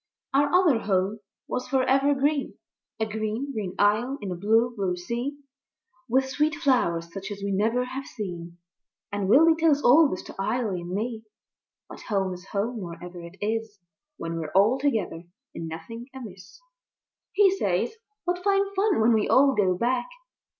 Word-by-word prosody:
Our 285 +1 +4
other 355 -9 +4
Home 200 +1 0 0.3
was 250 - -3
for 265 -1 +2
ever 275 +2 +3
green, 285 +1 0 0.4
A 220 - +1
green, 220 +5 -3
green 195 -5 -4
isle 215 +7 +2
in 200 -3 -5
a - - -2
blue, 225 +6 +2
blue 190 -4 -1
sea, 235 +10 -4 0.7
With 265 +2 +2
sweet 300 +3 0
flowers 170 - +1
such 195 0 -6
as 200 -1 -7
we 200 - -1
never 225 +6 +1
have 265 +2 -6
seen; 175 -6 -7 0.5
And 200 -1 -2
Willy 320 +8 +7
tells 315 -3 +2
all 290 +5 +7
this 185 - -4
to - - -10
Eily 215 -3 -1
and 175 - -8
me. 220 +4 -3 0.6
But - - -11
Home 195 -3 0
is 180 +1 -11
Home 220 +4 -2
wherever 175 -1 -8
it 170 +2 -11
is, 220 0 -2 0.4
When 165 0 -4
we're 155 -2 -5
all 215 +7 +4
together 220 - -1 0.3
and 165 - -5
nothing 230 +10 -8
amiss. 210 - -10 0.7
He 390 -2 +5
says, 440 - 0 0.3
"What 355 0 -2
fine 395 0 +2
fun 395 - +2
when 230 +2 +5
we 215 -1 +1
all 275 +1 +5
go 190 -5 +2
back!" 245 +3 0
225 Hz, 170 wpm, -26 LUFS, 195-270 Hz, 0.7 s, Willy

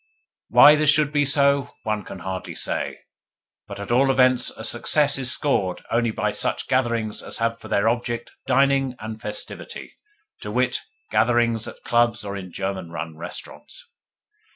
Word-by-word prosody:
Why 150 - +8
this 150 -1 +2
should 150 -1 +4
be 145 -1 +2
so 140 -1 +2
one 105 -1 -2
could 95 - -9
hardly 95 +1 -5
say, - - -2 0.7
but - - -8
at 100 - -6
all 135 +3 +4
events 130 -1 +3
a 110 - -10
success 140 +5 +2
is 130 -1 +2
scored 100 -11 0
only 115 0 +1
by 110 - -1
such - - 0
gatherings 120 -4 0
as - - -4
have 115 0 -1
for - - -11
their 105 0 +1
object 120 0 -2 0.2
dining 135 0 +2
and 110 0 -8
festivity 105 0 -6 0.5
to 105 - -7
wit, 125 +3 0 0.3
gatherings 120 -2 +2
at - - -11
clubs 120 -3 +1
or 100 0 -5
in 95 -2 -7
German 95 -1 -4
run 80 -1 -6
restaurants. - - -9
120 Hz, 160 wpm, -23 LUFS, 105-135 Hz, 0.7 s, Why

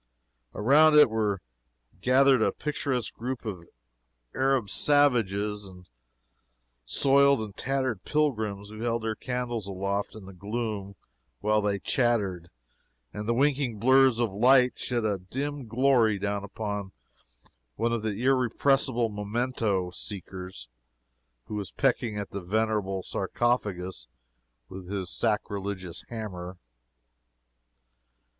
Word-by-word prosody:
Around 150 +8 +5
it 150 -6 +7
were 105 -3 0 0.6
gathered 130 0 +5
a - - +3
picturesque 140 -5 -2
group 125 +1 -5
of 90 -6 -6 0.7
Arab 135 -4 +1
savages 105 -8 +2
and 90 -1 -14 1.0
soiled 140 - +4
and 105 -2 -6
tattered 130 -6 -2
pilgrims, 110 -9 -1
who 110 - -9
held 115 0 -1
their 110 -1 -1
candles 120 -2 -3
aloft 100 +2 -2
in 110 -3 -10
the 95 - -11
gloom 100 0 -4 0.4
while 105 +5 +2
they 100 -1 0
chattered, 100 -6 0 0.6
and 105 +2 -5
the 115 - +2
winking 135 -3 +1
blurs 130 +2 +5
of 115 -5 0
light 125 +4 +5
shed 120 -3 -2
a 100 -3 0
dim 135 +7 -5
glory 120 -3 +3
down 100 0 -2
upon 100 -1 -5 0.8
one 115 - 0
of 115 - -1
the 105 -1 -3
irrepressible 130 -1 +2
memento 105 -3 -1
seekers 90 - -7 0.8
who 95 - -8
was 105 -2 -3
pecking 110 -4 0
at 100 -1 -5
the 100 - -4
venerable 100 -1 -1
sarcophagus 95 - -2 0.6
with 90 +3 -9
his 95 -3 -3
sacrilegious 100 -5 -2
hammer. 95 -6 -6
110 Hz, 115 wpm, -27 LUFS, 100-125 Hz, 1.0 s, it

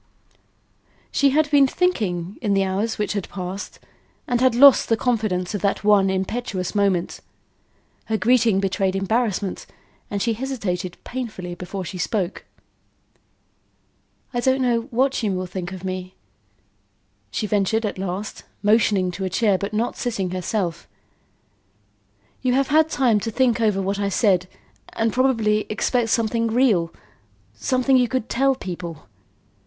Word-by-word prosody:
She 280 - +3
had 295 +1 +1
been 280 -2 +6
thinking 205 - -1
in 205 -4 +1
the 195 - +3
hours 200 +4 -1
which 210 - -1
had 200 -3 -4
passed, 185 +1 -6 0.5
and 245 -1 0
had 255 -2 +4
lost 275 +1 +7
the 225 - +3
confidence 215 -7 -1
of 205 - -3
that 200 - 0
one 205 -2 +4
impetuous 190 0 -2
moment. 195 -4 0 0.9
Her 220 - -1
greeting 230 -3 +3
betrayed 195 0 0
embarrassment 200 -1 -1 0.4
and 200 - -2
she 230 +3 +1
hesitated 210 -8 -3
painfully 215 -8 -5
before 180 +2 -6
she 185 +1 -6
spoke. 190 0 -2 1.9
"I 240 - 0
don't 260 +1 +2
know 235 -1 +1
what 265 +2 +1
you 210 -4 0
will 185 0 -2
think 180 0 -6
of 190 -1 -8
me," 185 0 -5 1.1
she 165 - -2
ventured 210 +2 +1
at 200 - -4
last, 190 +2 -4 0.2
motioning 205 -3 +3
to 190 +2 -6
a 190 - -1
chair 205 +2 +2
but 200 +2 -3
not 225 +3 -1
sitting 200 -7 -2
herself. 185 -1 -3 1.5
"You 250 -1 +1
have 275 +2 +1
had 315 +2 +4
time 245 -8 +2
to 225 - -3
think 240 0 +1
over 210 -3 +2
what 195 +1 -2
I 200 -1 0
said 190 -3 +2 0.5
and 225 -1 0
probably 225 -5 +2
expect 225 +2 0
something 230 0 +1
real, 220 -8 +2 0.6
something 255 - +2
you 250 -1 +3
could 255 -1 -2
tell 270 +2 +2
people. 170 - -7
210 Hz, 145 wpm, -22 LUFS, 190-245 Hz, 1.9 s, lost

